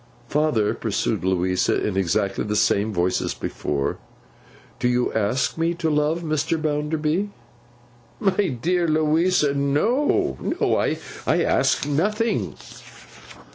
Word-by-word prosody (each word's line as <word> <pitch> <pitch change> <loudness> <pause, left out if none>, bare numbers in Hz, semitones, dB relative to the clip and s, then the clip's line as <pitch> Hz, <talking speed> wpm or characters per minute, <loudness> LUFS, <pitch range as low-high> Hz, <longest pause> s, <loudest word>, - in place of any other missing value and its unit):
'Father,' 145 -9 +1
pursued - - -2
Louisa 90 0 +1
in 105 - -2
exactly 95 +1 0
the 105 0 -2
same 105 +1 +2
voice 90 -1 0
as - - -3
before, 70 -2 -3 0.8
'do 125 - +1
you 125 0 +1
ask 110 +8 0
me 165 +1 +1
to 160 -1 -1
love 150 +3 +1
Mr. 155 +1 0
Bounderby?' 155 +4 -1 0.9
'My 195 0 +2
dear 175 +5 +1
Louisa, 155 0 +2
no. 145 - +1
No. - - 0
I - - 0 0.5
ask - - +2
nothing. 210 +11 0
150 Hz, 115 wpm, -23 LUFS, 105-165 Hz, 0.9 s, same